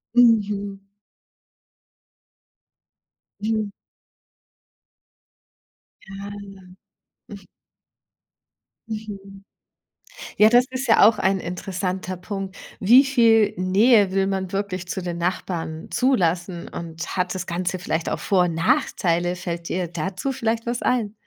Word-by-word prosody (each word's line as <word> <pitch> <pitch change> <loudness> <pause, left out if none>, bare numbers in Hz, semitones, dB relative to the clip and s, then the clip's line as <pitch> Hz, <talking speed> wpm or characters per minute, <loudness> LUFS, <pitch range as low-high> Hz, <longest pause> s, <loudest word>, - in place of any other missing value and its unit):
Mhm. 205 -4 +3 2.6
Mhm. 215 -1 -1 2.5
Ah, 200 - -6
ja. 190 -2 -13 2.1
Mhm. 200 -3 -8 0.9
Ja, 215 +1 +7
das 245 +1 +5
ist 260 +1 -3
ja 225 -2 +6
auch 215 -1 +3
ein 190 0 +1
interessanter 185 +1 -4
Punkt. 195 +1 -6 0.2
Wie 245 +8 +6
viel 225 -5 +4
Nähe 200 +2 +4
will 195 0 +1
man 190 -1 -2
wirklich 190 -2 -3
zu 190 - -3
den 175 -1 -4
Nachbarn 170 -2 -3
zulassen? 180 -8 0
Und 165 +1 -7
hat 180 0 0
das 185 0 -4
Ganze 180 +1 -2
vielleicht 165 -2 -2
auch - - -2
Vor 185 -3 +2
und 170 -2 -2
Nachteile? 175 - +1
Fällt 170 -1 -5
dir 180 -2 -1
dazu 190 - -3
vielleicht 230 -1 -2
was 240 0 -2
ein? 225 -5 0
195 Hz, 105 wpm, -23 LUFS, 180-215 Hz, 2.6 s, Ja